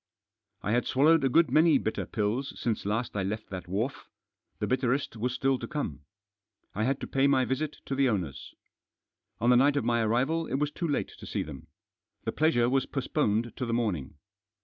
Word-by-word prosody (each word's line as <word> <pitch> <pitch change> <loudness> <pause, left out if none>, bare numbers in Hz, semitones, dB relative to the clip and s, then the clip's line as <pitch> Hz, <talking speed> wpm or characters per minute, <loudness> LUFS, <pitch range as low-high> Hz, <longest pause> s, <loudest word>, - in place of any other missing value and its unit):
I 105 - -1
had 120 +2 +1
swallowed 155 +3 +4
a 135 - +3
good 160 +1 +4
many 155 +1 +5
bitter 110 - -2
pills 115 +6 -2
since 110 -4 -2
last 110 +3 -1
I 100 - 0
left 100 +3 -4
that 90 -3 -6
wharf 110 +9 -3 0.2
— - - -52
the - - 0
bitterest 130 0 0
was 120 +3 -1
still 135 +1 +1
to - - -5
come. 80 - -4 0.7
I 110 +3 -1
had 135 +1 0
to - - -3
pay 135 +1 +2
my 130 -2 +3
visit 145 +4 -2
to - - -3
the 135 -1 +3
owners. 85 - -3 0.8
On 120 +3 +3
the - - +6
night 140 +3 +4
of 125 - 0
my 120 -1 +2
arrival 130 +9 +1
it - - -2
was 145 +1 0
too 170 - -3
late 145 - -1
to - - -9
see - - -2
them. 70 -4 -10 0.6
The - - -1
pleasure 150 -7 +2
was 135 +1 +1
postponed 120 -5 -1
to 130 - -3
the 115 - -1
morning. 95 - -2
125 Hz, 205 wpm, -29 LUFS, 110-140 Hz, 0.8 s, the